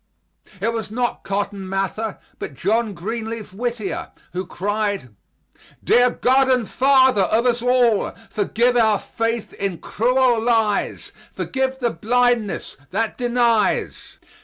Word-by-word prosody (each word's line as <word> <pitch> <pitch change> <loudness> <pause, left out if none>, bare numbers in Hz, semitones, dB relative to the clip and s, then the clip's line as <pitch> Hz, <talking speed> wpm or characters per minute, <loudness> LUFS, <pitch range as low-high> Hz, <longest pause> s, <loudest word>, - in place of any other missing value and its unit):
It 225 +4 0
was 225 -2 -4
not 240 +1 -2
Cotton 200 -1 -3
Mather, 195 +3 -2 0.2
but 140 - -6
John 215 - 0
Greenleaf 220 +2 -5
Whittier, 235 -1 -3 0.2
who 185 0 -4
cried: 205 - -2 0.7
"Dear 245 +1 +5
God 265 +2 +2
and 250 -4 +2
Father 260 -4 +4
of 220 +6 +2
us 240 -1 +2
all, 245 -3 +3 0.2
Forgive 235 +4 +1
our 220 -3 +4
faith 230 +2 -3
in 195 -3 -3
cruel 245 +2 +2
lies, 225 -3 0 0.2
Forgive 265 0 -2
the 240 -3 0
blindness 240 +2 0
that 220 +3 -1
denies. 240 -3 0
225 Hz, 120 wpm, -21 LUFS, 205-245 Hz, 0.7 s, Dear